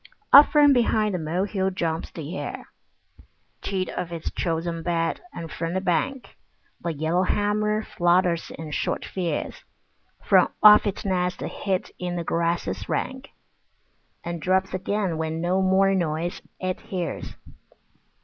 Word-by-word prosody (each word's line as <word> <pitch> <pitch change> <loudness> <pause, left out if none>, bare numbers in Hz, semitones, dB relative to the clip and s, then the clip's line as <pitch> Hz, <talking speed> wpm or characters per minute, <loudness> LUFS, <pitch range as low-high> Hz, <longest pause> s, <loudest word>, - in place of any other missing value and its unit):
Up 285 +2 +11
from 290 -2 +6
behind 220 -4 +2
the 180 - -1
molehill 190 +4 -1
jumps 165 -3 -2
the 160 -4 -8
hare, 185 - -6 0.9
Cheat 190 -2 -2
of 175 - -4
his 170 -2 -5
chosen 165 0 -2
bed, 165 -1 -1
and 165 -2 -7
from 165 +1 -3
the - - +2
bank 240 +9 -2 0.4
The 170 - -2
yellowhammer 205 +7 0
flutters 175 -2 +1
in 160 -1 -7
short - - -2
fears 180 -3 -3 0.6
From - - +4
off 210 0 +9
its 200 +1 -4
nest 180 -2 -1
hid 190 -2 -3
in 180 -1 -3
the 170 - -2
grasses 165 - -1
rank, 265 +1 -3 0.9
And 170 -1 -5
drops 190 +2 +1
again 185 -2 -1
when 160 0 -2
no 180 +3 +1
more 190 +1 +3
noise 170 -2 -1 0.2
it 185 0 -2
hears. 180 -4 -5
180 Hz, 135 wpm, -25 LUFS, 165-195 Hz, 0.9 s, Up